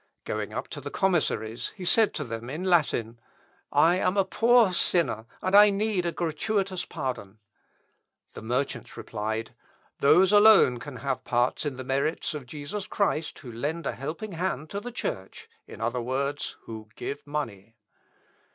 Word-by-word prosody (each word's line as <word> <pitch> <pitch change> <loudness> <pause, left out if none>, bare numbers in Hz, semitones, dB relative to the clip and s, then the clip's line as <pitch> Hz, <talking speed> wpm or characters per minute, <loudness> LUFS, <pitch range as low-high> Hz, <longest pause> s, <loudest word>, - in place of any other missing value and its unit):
Going - - -3
up - - -4
to - - -7
the - - -5
commissaries, 150 - 0
he 185 - -7
said 220 +4 +5
to 150 - -2
them 115 -1 -6
in 155 +7 -4
Latin, 140 -10 +1 0.5
"I 170 +3 +4
am 185 +1 +1
a 195 - +4
poor 230 +1 +4
sinner, 165 -11 +1 0.2
and 200 +1 +6
need 205 -4 0
a - - 0
gratuitous 185 +3 -1
pardon!" 110 -6 -5 1.0
The - - -8
merchants 125 +5 -3
replied, 110 +2 -4 0.5
"Those 175 +7 +5
alone 205 - +7
can - - -8
have 135 -2 -3
part 120 +4 0
in 135 -3 -4
the 130 - -5
merits 140 +6 -1
of 145 -4 -7
Jesus 155 +9 -5
Christ 165 -6 -1
who 125 -5 -10
lend 150 +8 -3
a - - 0
helping 160 +10 -6
hand 165 -4 -3
to 200 - -2
the 245 +4 -7
Church, 95 - -5 0.2
in - - -10
other 120 +2 -1
words, 140 +4 -2
who 110 -1 -9
give 140 +1 -6
money." 115 -8 -5
150 Hz, 160 wpm, -27 LUFS, 120-185 Hz, 1.0 s, alone